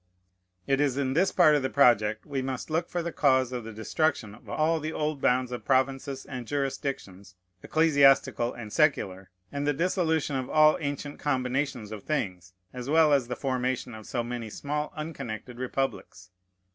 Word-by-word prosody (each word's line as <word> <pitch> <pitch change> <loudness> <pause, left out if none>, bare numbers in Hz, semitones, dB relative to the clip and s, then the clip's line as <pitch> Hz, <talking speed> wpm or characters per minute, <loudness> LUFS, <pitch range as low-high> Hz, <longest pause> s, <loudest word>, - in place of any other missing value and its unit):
It 135 +1 +1
is 140 -3 +1
in 135 -2 0
this 180 +6 +2
part 170 -4 +5
of 145 - +3
the 130 - -1
project 110 -6 +3
we 140 -2 -3
must 130 +3 -4
look 165 +2 0
for 175 -1 -2
the 170 - -3
cause 130 -5 +2
of 125 -2 -4
the 115 - -7
destruction 110 +1 -1
of 105 - -15
all 160 +1 +1
the 155 +1 -4
old 150 -3 -2
bounds 125 0 +2
of 125 - -5
provinces 135 0 0
and 125 -4 -7
jurisdictions, 135 -9 -4 0.3
ecclesiastical 140 -6 +3
and 110 -3 -9
secular, 95 - +1 0.2
and 140 +1 -3
the 145 - +3
dissolution 160 -2 0
of 130 -1 -3
all 155 0 +5
ancient 145 -1 -4
combinations 130 -4 -1
of 110 -2 -6
things, 95 - -3 0.2
as 125 +1 -6
well 155 -1 +5
as 135 -4 +2
the 125 - -3
formation 130 -2 -2
of 110 -1 -10
so 120 - -2
many 120 -1 -5
small 150 +6 -3
unconnected 130 -6 -6
republics. 125 -8 -4
135 Hz, 175 wpm, -27 LUFS, 120-150 Hz, 0.3 s, part